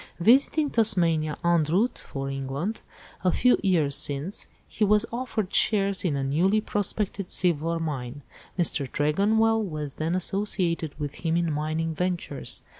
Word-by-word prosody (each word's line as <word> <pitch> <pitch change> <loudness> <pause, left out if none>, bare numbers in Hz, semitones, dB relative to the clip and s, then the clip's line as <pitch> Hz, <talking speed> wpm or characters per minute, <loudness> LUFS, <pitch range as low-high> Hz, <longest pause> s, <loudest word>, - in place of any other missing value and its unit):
"Visiting 275 - +3
Tasmania 170 -9 +2
en 170 -2 +3
route 195 +11 0
for 135 -1 -6
England 135 +10 -4 0.4
a 180 - +3
few 250 +6 +3
years 165 -8 +1
since, 145 +9 -1 0.2
he 220 - -2
was 210 +2 +3
offered 235 -5 -3
shares 200 -3 +4
in 165 -6 0
a 135 - -2
newly 175 +10 +2
prospected 205 -2 -2
silver 165 -1 +1
mine. 145 -4 -5 0.3
Mr. 150 -6 +1
Tregonwell 220 +9 +2
was 150 -7 -4
then 160 +3 -2
associated 180 -5 -2
with 145 -1 -4
him 165 0 +1
in 170 -2 0
mining 155 +2 -2
ventures. 175 -5 -3
170 Hz, 140 wpm, -26 LUFS, 150-205 Hz, 0.4 s, shares